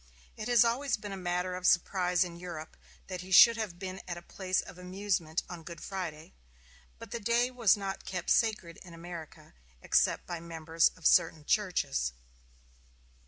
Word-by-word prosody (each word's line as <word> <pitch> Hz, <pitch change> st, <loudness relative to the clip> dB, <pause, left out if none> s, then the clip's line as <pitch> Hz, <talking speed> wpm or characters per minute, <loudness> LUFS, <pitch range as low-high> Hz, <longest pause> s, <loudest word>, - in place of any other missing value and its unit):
It 215 Hz, -, -6 dB
has 240 Hz, -2 st, +5 dB
always 245 Hz, +2 st, 0 dB
been 205 Hz, -1 st, -8 dB
a -, -, -4 dB, 0.2 s
matter 180 Hz, +1 st, -1 dB
of 180 Hz, 0 st, -1 dB
surprise 180 Hz, 0 st, +3 dB
in 175 Hz, -2 st, -7 dB
Europe 170 Hz, -3 st, -8 dB, 0.3 s
that 185 Hz, -2 st, -6 dB
he 185 Hz, +1 st, -11 dB
should 230 Hz, +5 st, +9 dB
have 215 Hz, -6 st, -4 dB
been 190 Hz, 0 st, -6 dB
at 170 Hz, -1 st, -4 dB
a 175 Hz, -, -10 dB
place 185 Hz, +1 st, -2 dB
of 180 Hz, -, -7 dB
amusement 180 Hz, -3 st, -2 dB
on 175 Hz, -2 st, -8 dB
Good 170 Hz, +1 st, -9 dB
Friday; 170 Hz, -, -6 dB, 0.6 s
but -, -, -11 dB
the 235 Hz, -, -3 dB
day 235 Hz, +3 st, +1 dB
was 235 Hz, -6 st, +4 dB
not 195 Hz, -1 st, -5 dB
kept 180 Hz, -2 st, -3 dB
sacred 205 Hz, -7 st, +1 dB
in 175 Hz, -2 st, -12 dB
America, 165 Hz, -, -10 dB, 0.3 s
except -, -, +2 dB
by 175 Hz, -1 st, -5 dB
the 165 Hz, -, -12 dB
members 165 Hz, 0 st, +2 dB
of 165 Hz, -, -15 dB
certain 155 Hz, -2 st, +4 dB
churches. 70 Hz, -, 0 dB
180 Hz, 175 wpm, -30 LUFS, 170-200 Hz, 0.6 s, should